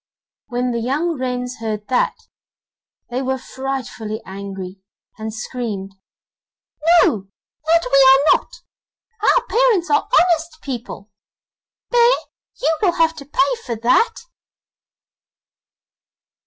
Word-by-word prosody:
When 245 0 -1
the 235 - -1
young 295 +8 -1
wrens 250 -1 -3
heard 215 -2 -4
that, 255 - +1 1.0
they 250 +2 -1
were 265 0 -1
frightfully 255 -5 -5
angry, 195 -1 -7 0.4
and 220 0 -4
screamed: 215 -3 -5 1.1
'No, 195 -4 0 0.4
that 335 -1 +3
we 275 -1 +7
are 275 - +6
not! 485 - -8 0.6
Our - - +3
parents 455 -8 +2
are 435 - +2
honest 340 -6 +3
people! 235 -5 -6 0.8
Bear, 480 0 +5 0.5
you 325 - +3
will 370 -5 +3
have 325 -1 +2
to 280 - -9
pay 360 - +1
for 235 - -3
that! 255 - +2
260 Hz, 110 wpm, -20 LUFS, 225-335 Hz, 1.1 s, we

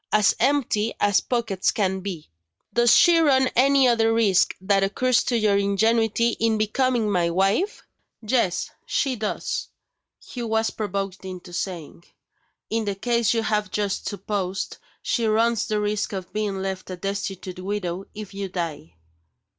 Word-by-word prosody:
as 210 -2 +4
empty 240 -6 +1
as 205 -1 +3
pockets 225 -6 -1
can 190 -2 0
be, 185 -5 -6 0.5
does 240 0 +5
she 340 -1 +6
run 265 -5 +4
any 270 +1 +5
other 225 -2 +3
risk 220 -5 +3
that 195 +1 +2
occurs 250 +5 +2
to 240 - 0
your 210 -2 +2
ingenuity 220 +3 +2
in 225 -1 +2
becoming 235 +1 +1
my 180 -4 +1
wife?" 195 - 0 0.4
"Yes, 215 -6 0 0.2
she 270 -3 0
does!" 215 -2 -3 0.6
Hugh 240 -2 -5
was 220 0 +1
provoked 195 -2 -4
into 185 -1 -8
saying. 170 -2 -5 0.7
"In 225 0 0
the 200 -1 -2
case 235 +1 +1
you 225 - +1
have 210 -2 0
just 205 0 -2
supposed, 195 -2 -4 0.2
she 230 -2 0
runs 225 +1 +2
the 215 -1 0
risk 210 0 -1
of 190 -2 -6
being 205 -3 -2
left 190 -1 -4
a 185 - -4
destitute 195 -1 -4
widow 190 -1 -3
if 210 -2 -8
you 195 -1 -4
die." 160 - -5
210 Hz, 150 wpm, -24 LUFS, 190-230 Hz, 0.7 s, she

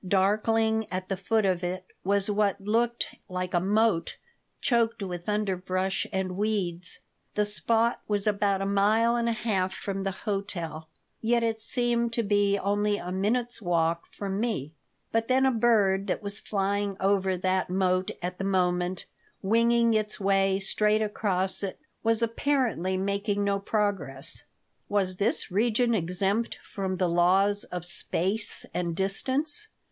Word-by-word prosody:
Darkling 220 +3 +2
at 185 0 -4
the 195 - 0
foot 215 +3 +1
of 185 -2 +1
it 185 +1 -3 0.2
was 200 +1 +2
what 205 -2 +1
looked 230 +4 0 0.2
like 180 0 -3
a 175 - +4
moat 205 -1 +1 0.4
choked 230 -3 +1
with 175 0 -5
underbrush 190 -2 -1
and 190 -2 -2
weeds. 185 -4 -1 0.4
The 210 - +2
spot 225 +3 +1
was 205 -2 0
about 200 -2 +1
a - - -1
mile 215 +4 +3
and 235 0 +1
a - - +2
half 200 -5 0
from 195 -1 -4
the 195 - -1 0.2
hotel, 170 -6 -3 0.3
yet 235 +1 +2
it 225 -1 0
seemed 235 0 +2
to 235 - +1
be 205 -1 +2
only 205 +1 +1
a 180 - -6
minute's 230 +6 -1
walk 170 -2 0
from 195 -1 -4
me. 205 - -2 0.4
But 225 0 +1
then 260 +1 +3
a 265 - +4
bird 215 -5 +3
that 195 - -2
was 205 +1 -2
flying 200 0 -1
over 190 -1 +2
that 185 +1 0
moat 185 0 +1
at 180 +1 -4
the - - -2
moment, 180 -1 0 0.4
winging 230 +3 +3
its 215 -1 -1
way 195 -1 +2
straight 210 +2 +2
across 195 -3 0
it, 195 -2 -4 0.2
was 225 0 +2
apparently 230 - 0
making 200 +1 -1
no 200 0 +1
progress. 190 -9 -2 0.4
Was 190 -3 0
this 205 0 0
region 235 +4 +2
exempt 195 +4 0
from 190 -2 -3
the 185 -1 +1
laws 190 +4 +3
of 180 -1 -5
space 190 +4 -1
and 170 -2 -2
distance? 270 - 0
200 Hz, 150 wpm, -27 LUFS, 185-220 Hz, 0.4 s, a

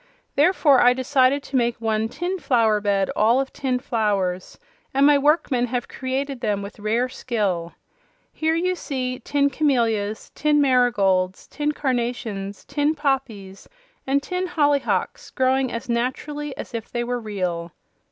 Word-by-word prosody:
Therefore 295 -3 +4
I 245 0 +6
decided 260 +1 +2
to 275 - -7
make 240 -2 +1
one 220 -1 0
tin 360 +8 -3
flower 225 -8 +2
bed 200 -2 +1
all 230 +4 +4
of 270 0 -3
tin 260 -2 -1
flowers, 205 -7 -1 0.4
and 275 +1 +5
my 295 0 +6
workmen 280 -4 +2
have 245 0 -3
created 265 0 -3
them 205 -4 -1
with 200 +2 -9
rare 225 +4 0
skill. 200 -10 -2 0.6
Here 320 +1 0
you 365 +2 +1
see 255 -7 -4
tin 280 +2 +1
camelias, 230 -8 0
tin 300 0 +2
marigolds, 205 -9 +2
tin 300 0 -2
carnations, 235 -7 -3
tin 290 +2 0
poppies 255 -10 -3 0.4
and 280 +1 +1
tin 365 +3 -2
hollyhocks 290 -5 0
growing 260 -1 +1
as 230 - -5
naturally 265 +5 -3
as - - -8
if 230 -2 -5
they 240 -1 -1
were 245 0 -2
real." 180 -6 -3
250 Hz, 145 wpm, -23 LUFS, 215-280 Hz, 0.6 s, I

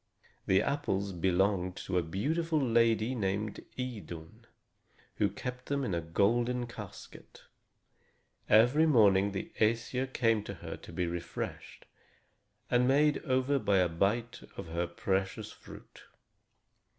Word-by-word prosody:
The 95 0 +4
apples 100 -9 -1
belonged 95 +1 +1
to 90 -1 +1
a - - +1
beautiful 155 - -1
lady 115 -2 +2
named 105 -2 -2
Idun, 105 -11 -7 0.7
who 100 - +2
kept 125 +5 -6
them 140 -1 -1
in 100 - -2
a 85 - 0
golden 120 +9 +1
casket. 110 -5 -11 1.1
Every 125 +9 +5
morning 100 -7 +5
the 95 - -5
Æsir 115 +4 +1
came 115 -4 +2
to - - -6
her - - -7
to - - -12
be 90 - -1
refreshed 85 0 -6 0.9
and 125 0 +4
made 145 +2 +3
over 130 +1 +2
by 100 -5 +2
a 90 -2 +3
bite 105 +8 0 0.2
of 80 - -7
her 85 +1 -1
precious 95 +2 -2
fruit. - - -14
110 Hz, 125 wpm, -31 LUFS, 95-125 Hz, 1.1 s, Every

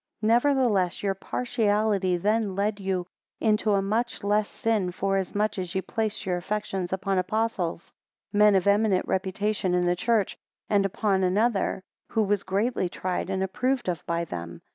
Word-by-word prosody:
22 215 - 0
Nevertheless 240 -9 +2
your 195 -1 +1
partiality 205 -3 0
then 210 +1 0
led 205 +1 0
you 190 -2 -1 0.3
into 215 -1 +2
a 195 -1 +2
much 225 +4 -1
less 210 +1 +1
sin 215 -5 0
forasmuch 195 +2 -1
as 180 0 -5
ye 190 - +1
placed 220 +2 -2
your 180 -2 0
affections 190 -1 -3
upon 190 0 0
Apostles, 185 -4 -2 0.4
men 210 0 +5
of 190 - +2
eminent 200 -1 +3
reputation 190 0 0
in 180 0 +2
the 175 0 +2
church; 220 +1 +1 0.3
and 200 -1 +3
upon 195 -1 0
another, 195 0 +1 0.3
who 220 - +1
was 205 -1 +1
greatly 200 0 0
tried 185 +1 -3
and 190 0 0
approved 250 +6 -1
of 170 -4 -2
by 170 0 0
them. 85 - -7
195 Hz, 160 wpm, -26 LUFS, 185-215 Hz, 0.4 s, men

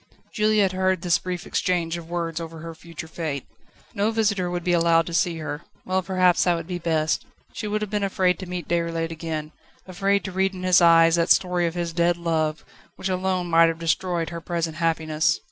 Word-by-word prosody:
Juliette 215 -3 +3
heard 185 -1 0
this 175 -2 +3
brief 180 -1 -5
exchange 170 -2 0
of 170 -1 -8
words 170 -1 -3
over 165 0 -7
her 165 +1 -7
future 160 0 -9
fate. 160 -4 -4 0.5
No 205 +2 +1
visitor 205 -5 0
would 175 -1 -3
be 180 - +1
allowed 165 -1 +4
to 170 - -7
see 170 0 +1
her. 155 -1 -5 0.2
Well, 185 0 0
perhaps 185 -1 +3
that 175 -1 +3
would 165 -1 -5
be 180 0 -4
best. 160 -2 0 0.3
She 215 - -4
would 215 +1 -1
have 210 - -5
been 210 -1 0
afraid 185 -2 +1
to 190 - -7
meet 180 -3 -5
Déroulède 165 -1 -1
again, 160 -2 -5 0.4
afraid 195 +2 0
to 190 - -5
read 190 +1 0
in 185 - -7
his 185 0 +5
eyes 165 0 +6
that 170 +1 +1
story 180 -2 +3
of 165 - -4
his 170 -1 -3
dead 170 +1 +2
love, 160 -2 -1 0.3
which 190 - -4
alone 185 -1 0
might 165 -1 +5
have 165 - -3
destroyed 170 0 -1
her 170 0 -6
present 165 -2 -3
happiness. 160 - +1
170 Hz, 210 wpm, -24 LUFS, 165-185 Hz, 0.5 s, eyes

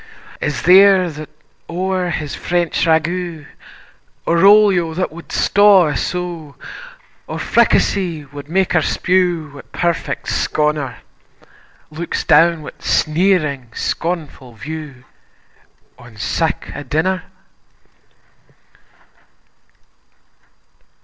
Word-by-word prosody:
Is 145 -5 -3
there 185 0 +6
that 155 0 -9 0.4
o'er 185 +1 -2
his 155 -3 -4
French 175 -1 -1
ragout, 165 0 -1 0.8
Or 170 +1 +2
olio 195 -6 +4
that 185 -2 -2
wad 170 +1 -12
staw 200 -5 +4
a 150 - -3
sow, 175 -5 -4 0.7
Or - - -5
fricassee 170 -7 +1
wad 145 +1 -11
mak 190 +2 +1
her 175 - +3
spew 175 -2 0
Wi' 140 - -10
perfect 170 -1 -2
sconner, 150 -4 -1 0.9
Looks 165 +2 -4
down 165 +1 +4
wi' - - -8
sneering, 155 -6 +1
scornfu' 150 -8 -4
view 150 0 -8 1.0
On 120 -3 -15
sic - - -2
a - - -6
dinner? 160 +7 -1
165 Hz, 95 wpm, -18 LUFS, 150-180 Hz, 1.0 s, there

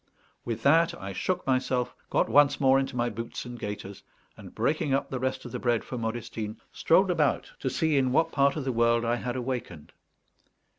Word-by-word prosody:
With 115 -2 -4
that 165 +4 +4
I 95 0 -6
shook 180 - -2
myself, 130 -1 0 0.2
got - - +2
once 145 -1 +4
more 135 -1 +5
into 135 -1 -3
my 120 -1 +1
boots 115 +2 -5
and 120 -1 -8
gaiters, 100 -2 -6 0.3
and, - - -13
breaking 145 -2 +1
up 140 - -2
the 130 - -2
rest 130 +1 -2
of 120 - -7
the - - -4
bread 120 -2 +1
for - - -7
Modestine, 110 -2 -4
strolled - - +3
about - - 0
to - - -1
see 160 -3 +1
in 130 -2 +2
what 165 +5 +2
part 140 -1 +2
of 150 - -3
the 130 - 0
world 115 0 +2
I 120 +1 +1
had 120 0 -4
awakened. 125 - -5
125 Hz, 200 wpm, -27 LUFS, 115-135 Hz, 0.3 s, more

